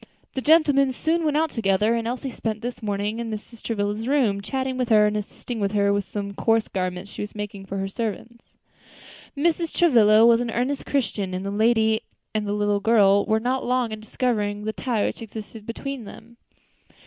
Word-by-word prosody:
The 265 - -2
gentlemen 290 -3 +4
soon 330 +6 0
went 300 -1 +1
out 320 0 +1
together, 210 0 +2
and 230 -1 -1
Elsie 255 +2 -3
spent 220 -1 -4
the 245 +1 -3
morning 205 +1 -2
in 235 -1 -4
Mrs. 220 +1 -8
Travilla's 210 0 -2
room, 245 -8 +2
chatting 260 +4 -2
with 255 -1 -1
her 215 -2 +6
and 210 0 0
assisting 215 +3 -5
her 200 0 +2
with 200 0 0
some 200 -1 -5
coarse 225 +2 +1
garments 185 +1 -3
she - - -7
was 210 +1 -6
making 205 -2 -6
for 195 - -4
her 195 0 -2
servants. 230 +3 -5 0.9
Mrs. 330 +2 +1
Travilla 225 -9 +5
was 235 0 +5
an 240 - -2
earnest 250 +5 -2
Christian, 200 -8 -1
and 185 +1 -4
the 200 - -2
lady 220 +1 +3 0.3
and 215 -1 -1
the 205 - -1
little 205 -1 +1
girl 200 -2 +4
were 220 0 +2
not 255 +3 -1
long 250 -2 0
in 215 - -5
discovering 210 -2 -1
the 220 - -2
tie 230 -5 -1
which - - -4
existed 220 -1 -9
between 260 +1 -5
them. 230 +3 -13
220 Hz, 195 wpm, -24 LUFS, 205-245 Hz, 0.9 s, her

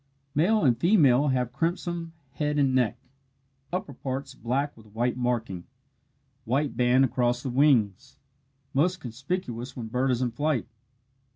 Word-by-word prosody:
Male 195 +9 +3
and 125 -3 +5
female 145 - +4
have 125 -3 0
crimson 170 0 -2 0.2
head 150 +1 -1
and 135 -2 +3
neck 125 -3 +2 0.7
upper 180 -5 -3
parts 135 +1 -5
black 135 +4 -2
with 110 -1 -17
white 120 +4 -1
marking 120 -7 -2 0.8
white 135 +5 0
band 125 +2 +4
across 120 0 0
wings 130 -4 +2 0.6
most 180 +7 +2
conspicuous 130 -1 -5
when 115 -3 -5
bird 125 +3 0
is 125 0 +1
in 120 - -1
flight. 145 +1 0
130 Hz, 130 wpm, -27 LUFS, 120-150 Hz, 0.8 s, and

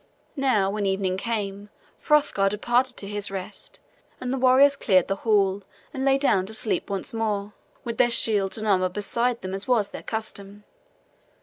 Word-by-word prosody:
Now 250 -9 +1
when 205 -1 -2
evening 190 -1 0
came 205 -1 -4 0.4
Hrothgar 290 -10 +3
departed 240 +5 0
to 200 - -6
his 205 0 -2
rest, 190 -1 -8 0.4
and 250 0 -3
the - - -1
warriors 265 +2 +5
cleared 190 -9 +2
the 195 - -2
hall 200 -3 +1 0.3
and 265 -2 -3
lay 270 0 +3
down 200 -9 +1
to 220 - -7
sleep 205 -5 -2
once 195 +2 -3
more, 210 -2 -2 0.3
with 235 -2 -5
their 240 - +5
shields 210 -4 +3
and 215 0 -3
armor 185 -2 +2
beside 235 +5 -2
them 185 0 -5
as 195 +1 -4
was 225 -5 +2
their - - -8
custom. 205 -2 -6
210 Hz, 175 wpm, -24 LUFS, 195-240 Hz, 0.4 s, warriors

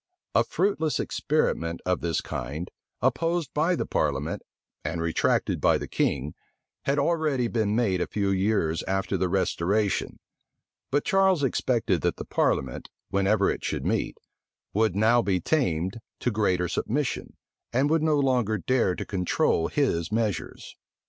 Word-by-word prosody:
A - - +5
fruitless 170 -6 0
experiment 85 - 0
of 90 0 0
this 85 -2 0
kind, 75 +8 -5 0.3
opposed 170 -1 +1
by 165 +4 +2
the - - -2
parliament, 75 +1 -1 0.4
and 85 +2 -3
retracted 85 0 +1
by - - +4
the - - -6
king, 70 +2 -1 0.5
had 140 +1 +1
already 150 -4 +1
been 110 -3 0
made 100 -7 +1
a - - 0
few 100 -2 0
years 95 -4 +1
after 95 0 0
the 90 - 0
restoration; 95 +2 0 0.7
but 145 +2 +1
Charles 190 -5 +3
expected 115 - +1
that - - 0
the - - -7
parliament, 65 -2 0 0.2
whenever 100 +2 +3
it - - -5
should - - -2
meet, - - -1 0.6
would 110 -2 +2
now 115 +4 +4
be 95 -4 +1
tamed 95 - 0 0.2
to 125 - +1
greater 95 -5 +1
submission, 125 - -2 0.3
and 130 +4 +2
would 160 -1 +3
no 155 -1 +3
longer 125 -6 +2
dare 100 0 +1
to - - -5
control 90 -3 +1
his 90 - 0
measures. 110 -2 -2
105 Hz, 145 wpm, -26 LUFS, 90-140 Hz, 0.7 s, A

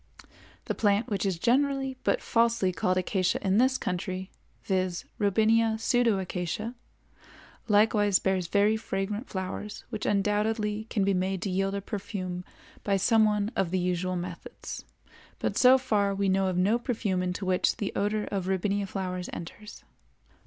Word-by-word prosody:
The - - -1
plant 205 +1 +1
which 200 -1 0
is 185 -3 -1
generally 270 +5 +1
but - - +1
falsely 230 -5 +2
called 185 +1 0
Acacia 185 0 +1
in 195 +2 +3
this 260 +1 +3
country, 185 +1 -4 0.3
viz., 185 -2 -1
Robinia 220 +2 +3
pseudoacacia, 215 -3 0 0.9
likewise 205 -2 +4
bears 190 -2 0
very 205 +4 +3
fragrant 210 +1 -3
flowers 190 +2 -5
which 215 -3 -3
undoubtedly 210 +1 0
can 205 - 0
be 195 0 +2
made 190 +1 0
to 195 - -2
yield 195 +1 0
a 200 - -2
perfume 190 -3 -5 0.4
by 200 -1 +2
some 220 +3 +4
one 210 0 +1
of 190 - +1
the 185 - 0
usual 180 0 -1
methods; 175 -1 -7 0.5
but - - -2
so 255 +1 +7
far 210 -6 +1
we 195 0 +1
know 190 0 +2
of 185 -1 -1
no 205 +6 +3
perfume 215 -7 -1
into 180 +2 -3
which 185 0 +1
the 205 - -3
odor 210 +1 0
of 190 -2 -2
Robinia 195 +1 0
flowers 185 -2 -4
enters. 210 +5 -9
200 Hz, 150 wpm, -28 LUFS, 185-215 Hz, 0.9 s, so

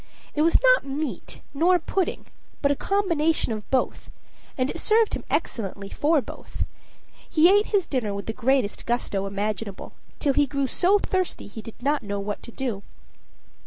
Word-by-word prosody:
It 300 - 0
was 330 +2 +5
not - - +6
meat, 275 - -4
nor 345 +6 +4
pudding, 370 0 -2 0.4
but 280 - +4
a - - +2
combination 330 - +1
of 210 -1 -7
both, 265 - 0 0.5
and 255 -1 +2
it - - -5
served 445 0 +3
him - - -3
excellently 200 -2 -2
for 300 +5 +2
both. - - -6 0.6
He 340 +5 +6
ate 415 +1 +3
his 400 -5 +2
dinner 245 -7 -1
with 200 0 -4
the 225 - -3
greatest 255 -3 +1
gusto 205 -5 0
imaginable, 200 0 -4 0.2
till 285 -3 +1
he 290 +1 +3
grew 280 +1 0
so 370 +9 +3
thirsty 370 -2 -1
he 210 +2 -8
did 225 - -11
not 290 +2 +2
know 200 -2 -3
what 205 +1 -4
to - - -10
do. 235 -6 -3
275 Hz, 170 wpm, -25 LUFS, 215-335 Hz, 0.6 s, not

